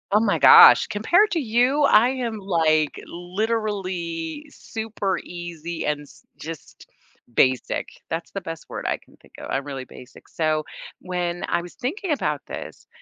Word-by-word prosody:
Oh 210 Hz, -, +6 dB
my 215 Hz, -2 st, +1 dB
gosh, -, -, +9 dB
compared 345 Hz, -, +3 dB
to 335 Hz, -, +1 dB
you, 250 Hz, +3 st, +2 dB
I 240 Hz, -3 st, +5 dB
am, 245 Hz, -4 st, -3 dB
like, 160 Hz, -5 st, +1 dB
literally 185 Hz, -, -3 dB
super 220 Hz, -7 st, -4 dB
easy 170 Hz, -1 st, -6 dB
and 150 Hz, 0 st, -1 dB
s 145 Hz, -, -17 dB
just 160 Hz, 0 st, -10 dB, 0.5 s
basic. 130 Hz, 0 st, +1 dB, 0.2 s
That's 165 Hz, +1 st, -4 dB
the 195 Hz, -, -5 dB
best 165 Hz, -2 st, -7 dB
word -, -, -6 dB
I -, -, 0 dB
can -, -, -23 dB
think -, -, -23 dB
of, -, -, -8 dB
I'm 135 Hz, -, -1 dB
really 135 Hz, -2 st, -6 dB
basic, 125 Hz, -, -15 dB
so, 155 Hz, -1 st, -1 dB, 0.3 s
when 175 Hz, -1 st, -3 dB
I -, -, 0 dB
was 175 Hz, 0 st, -11 dB
thinking 345 Hz, -, -3 dB
about 295 Hz, -, -1 dB
this, -, -, -9 dB
180 Hz, 155 wpm, -23 LUFS, 165-225 Hz, 0.5 s, gosh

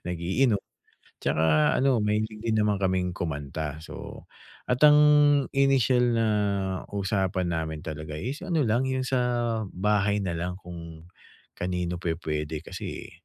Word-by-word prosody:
Nag-iinom 95 Hz, +7 st, +1 dB, 0.6 s
tsaka 80 Hz, -1 st, +2 dB
ano, 130 Hz, -3 st, +3 dB
mahilig 105 Hz, 0 st, -1 dB
din 110 Hz, -1 st, +1 dB
naman 105 Hz, -2 st, +1 dB
kaming 95 Hz, -2 st, 0 dB
kumanta. 75 Hz, -1 st, -4 dB
So, -, -, -9 dB, 0.5 s
at 125 Hz, 0 st, +1 dB
ang 150 Hz, 0 st, +8 dB, 0.6 s
initial 135 Hz, -2 st, +3 dB
na 115 Hz, 0 st, +2 dB, 0.7 s
usapan 95 Hz, -3 st, -1 dB
namin 80 Hz, -1 st, -3 dB
talaga 75 Hz, -1 st, -6 dB
is 130 Hz, -, -4 dB
ano 165 Hz, -6 st, +1 dB
lang, 120 Hz, +4 st, +1 dB
yung 130 Hz, 0 st, -1 dB
sa 130 Hz, 0 st, 0 dB, 0.5 s
bahay 105 Hz, +1 st, +1 dB
nalang 90 Hz, 0 st, -3 dB
kung 85 Hz, -3 st, -10 dB, 0.5 s
kanino 90 Hz, -1 st, -2 dB
pwe-puwede 80 Hz, -3 st, -3 dB
kasi -, -, -7 dB
eh, -, -, -14 dB
95 Hz, 125 wpm, -26 LUFS, 80-115 Hz, 0.7 s, ang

